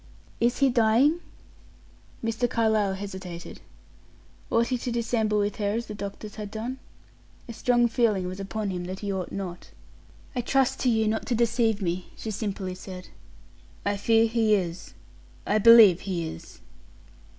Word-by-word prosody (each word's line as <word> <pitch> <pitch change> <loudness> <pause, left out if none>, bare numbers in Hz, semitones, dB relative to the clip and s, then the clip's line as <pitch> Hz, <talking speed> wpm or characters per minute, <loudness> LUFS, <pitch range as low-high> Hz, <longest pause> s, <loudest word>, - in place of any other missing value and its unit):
"Is 240 +1 +2
he 275 -1 +4
dying?" 240 +8 +3 1.1
Mr. 230 +2 0
Carlyle 220 -4 +1
hesitated. 190 -3 -8 0.9
Ought 230 +1 +2
he 255 - 0
to 245 - -3
dissemble 225 -2 0
with 205 0 0
her 205 -1 0
as 235 +2 -2
the 215 - -7
doctors 205 +1 -7
had 210 -1 -5
done? 235 +5 -5 0.7
A 235 - -7
strong 240 0 +2
feeling 225 -6 +1
was 185 +2 -5
upon 200 +1 -3
him 180 -1 -4
that 185 +1 -6
he 200 -1 -2
ought 185 -2 -4
not. 180 -3 -6 0.7
"I 250 - 0
trust 265 +2 +1
to 255 - +2
you 220 -2 +2
not 220 +1 -1
to 245 - +1
deceive 230 -2 +1
me," 175 +1 -2
she 220 - -5
simply 195 -3 -3
said. 185 0 -9 0.8
"I 205 0 +1
fear 225 +3 +3
he 225 -2 +2
is 180 -2 -4 0.5
I 210 +2 +2
believe 220 -5 +8
he 175 -4 -3
is." 80 - -10
215 Hz, 160 wpm, -26 LUFS, 195-235 Hz, 1.1 s, believe